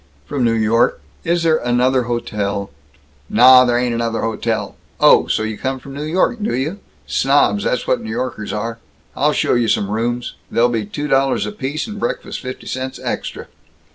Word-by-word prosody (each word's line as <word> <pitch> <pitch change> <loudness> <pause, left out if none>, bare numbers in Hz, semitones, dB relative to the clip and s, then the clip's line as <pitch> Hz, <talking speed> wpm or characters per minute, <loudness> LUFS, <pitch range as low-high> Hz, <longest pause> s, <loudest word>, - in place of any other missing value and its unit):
"From 140 -3 -2
New 115 -1 +3
York. 115 +1 +2 0.2
Is 170 0 +1
there 160 -1 +4
another 125 0 +1
hotel 105 -5 -2 0.3
" 70 -1 -34
"Nah, 130 +1 +9
there 120 -1 +2
ain't 125 -1 0
another 115 -1 -1
hotel! 115 -1 -2 0.2
Oh! - - +6
So - - 0
you 110 -1 -4
come 130 0 -2
from 135 +2 -11
New 145 +2 -5
York, 185 +8 +1
do 205 - -1
you? 155 +10 -2 0.3
Snobs, 135 -7 +2
that's 125 - 0
what 125 - +1
N' - - -8
Yorkers 110 -2 -3
are. 115 +2 -4 0.4
I'll 150 +3 +2
show - - +1
you 120 -2 +2
some 100 -2 +1
rooms. 120 +2 -2 0.2
They'll 120 +1 +3
be 110 -4 -2
two 145 +7 -4
dollars 135 -1 +2
apiece, 155 -7 -4
and 210 -2 -7
breakfast - - -3
fifty 130 -1 -7
cents 130 0 -4
extra." - - -4
125 Hz, 185 wpm, -19 LUFS, 115-135 Hz, 0.4 s, Nah